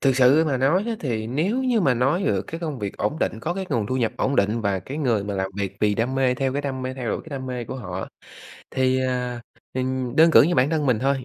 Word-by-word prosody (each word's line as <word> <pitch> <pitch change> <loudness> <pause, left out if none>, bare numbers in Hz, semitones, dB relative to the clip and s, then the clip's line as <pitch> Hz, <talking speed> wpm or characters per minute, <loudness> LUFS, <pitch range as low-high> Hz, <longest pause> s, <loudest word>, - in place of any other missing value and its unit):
Thực 135 -2 +2
sự 135 +5 +5
mà 140 -4 0
nói 145 +10 +2
á 230 - -1
thì 115 -6 -2
nếu 175 - 0
như 245 -4 +2
mà 135 -8 +3
nói 135 +10 +1
được 95 -2 +1
cái 165 +11 -7
công 155 -6 -4
việc 100 -3 -4
ổn 155 - -1
định, 110 - -1
có 170 +8 -2
cái 190 0 -4
nguồn 115 -7 0
thu 130 - -1
nhập 120 -3 0
ổn 140 - 0
định 105 +4 +2
và 100 -3 0
cái 135 - -7
người 115 -9 +1
mà 100 - -3
làm 95 0 -2
việc 100 -1 -3
vì 105 -1 +3
đam 115 +5 -1
mê, 130 -1 +2
theo 135 0 -1
cái 145 +1 -2
đam 130 -2 -3
mê, 130 0 -3
theo 125 -3 -4
đuổi - - -2
cái 160 - -13
đam 130 - -7
mê 125 -2 -4
của 130 - -6
họ, 95 -6 -5 0.6
thì, 130 0 +1
à, 125 -1 -2 0.3
ừm 130 0 -2
đơn 165 +1 +7
cử - - +8
như 170 +5 +2
bản 130 +3 +3
thân 155 -3 0
mình 125 -4 +3
thôi, 135 0 0
130 Hz, 285 wpm, -23 LUFS, 115-145 Hz, 0.6 s, cử